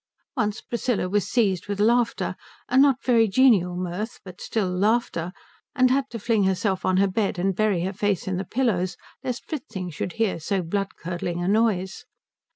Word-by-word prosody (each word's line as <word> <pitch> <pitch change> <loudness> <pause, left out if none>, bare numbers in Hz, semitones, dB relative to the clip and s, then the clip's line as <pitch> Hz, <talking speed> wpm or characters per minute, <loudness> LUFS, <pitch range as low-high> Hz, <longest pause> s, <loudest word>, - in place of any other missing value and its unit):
Once 210 +1 -1
Priscilla 235 -5 -1
was 205 +1 0
seized 200 -8 +1
with 205 0 -3
laughter 235 +2 +2 0.3
a - - -2
not 270 -1 +5
very 230 -3 +4
genial 200 -5 +4
mirth, 180 +5 -4
but 185 -1 -11
still 215 -4 -1
laughter 180 -2 0 0.4
and 255 -2 +4
had 270 0 +1
to 235 - -5
fling 220 -2 +1
herself 190 0 0
on 185 - +2
her 200 +1 +4
bed 195 0 -1
and 190 +1 0
bury 205 -4 +1
her 190 +2 -2
face 205 -2 -1
in 185 -1 -1
the 190 - -2
pillows 190 -7 0 0.3
lest 250 -1 -4
Fritzing 215 - -5
should 165 +3 -4
hear 225 -6 0
so 185 +4 -1
blood 195 +4 -2
curdling 175 0 -4
a - - -1
noise. 205 -3 +1
200 Hz, 180 wpm, -24 LUFS, 185-230 Hz, 0.4 s, not